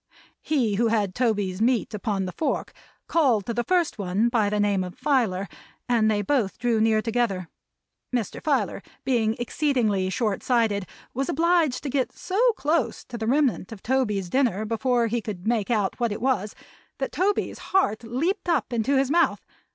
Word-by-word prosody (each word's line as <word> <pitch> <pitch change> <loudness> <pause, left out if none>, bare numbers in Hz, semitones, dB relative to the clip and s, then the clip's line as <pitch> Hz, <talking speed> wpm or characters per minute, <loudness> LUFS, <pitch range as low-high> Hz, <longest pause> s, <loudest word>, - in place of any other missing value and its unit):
He 240 -10 0
who 230 +1 +3
had 210 -4 +1
Toby's 205 -5 0
meat 235 -1 +1
upon 205 -2 -2
the 185 - -4
fork 310 - -2 0.3
called 255 - +2
to 235 - -2
the 240 +1 -1
first 345 -5 +1
one 200 +4 +1
by 225 -4 +2
the 210 0 -1
name 200 -2 +2
of 180 +4 -8
Filer, 245 -9 +1 0.4
and 230 -3 +3
they 205 -1 +1
both 230 -5 0
drew 235 -3 +1
near 220 -1 +3
together. 220 -7 -1 0.6
Mr. 240 -6 -2
Filer 260 -11 0 0.2
being 225 -4 +1
exceedingly 240 -7 0
short 210 -1 -1
sighted, 220 -6 +1 0.3
was 270 +2 -2
obliged 330 -4 +2
to 285 - -3
go 265 -2 +2
so 380 +3 -3
close 300 - -1
to 240 - -8
the 220 - -2
remnant 265 -6 +1
of 215 -4 -9
Toby's 220 -7 0
dinner 220 -1 +1
before 235 +2 +1
he 230 +1 -1
could 200 -5 -6
make 225 -2 0
out 210 -3 0
what 235 -2 +1
it 205 - -3
was, 240 -5 0 0.4
that - - -3
Toby's 400 +2 0
heart 245 - +2
leaped 325 - -2
up 280 -7 +1
into 235 +4 +1
his 270 0 +1
mouth. 340 +2 +2
230 Hz, 175 wpm, -25 LUFS, 210-265 Hz, 0.6 s, who